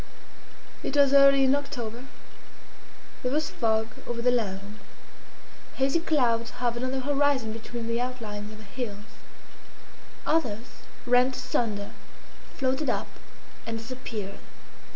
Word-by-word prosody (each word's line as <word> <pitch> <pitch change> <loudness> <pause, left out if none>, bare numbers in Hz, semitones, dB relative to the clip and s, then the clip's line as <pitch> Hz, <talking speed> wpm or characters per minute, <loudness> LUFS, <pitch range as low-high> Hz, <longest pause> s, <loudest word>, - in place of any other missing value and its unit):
It 290 - -2
was 280 -1 +6
early 275 -1 +8
in 265 0 +5
October. 250 -4 -3 1.2
There 250 - -1
was 300 +1 0
fog 220 -1 +1 0.2
over 240 -1 -3
the 250 +1 +3
land. 205 -3 -2 1.0
Hazy 270 +5 +2
clouds 240 -8 +2
hovered 240 -1 -1
on 255 - 0
the 265 0 -1
horizon 280 -4 +2
between 230 +1 -6
the 230 +1 0
outlines 215 -5 -4
of 215 - -10
the 215 - -12
hills; 210 -1 -5 1.2
others, 245 -8 -1 0.2
rent 250 +1 +4
asunder, 205 -6 -1 0.6
floated 265 +2 0
up - - -1 0.6
and 225 0 -2
disappeared. 225 -4 -6
245 Hz, 120 wpm, -28 LUFS, 220-270 Hz, 1.2 s, early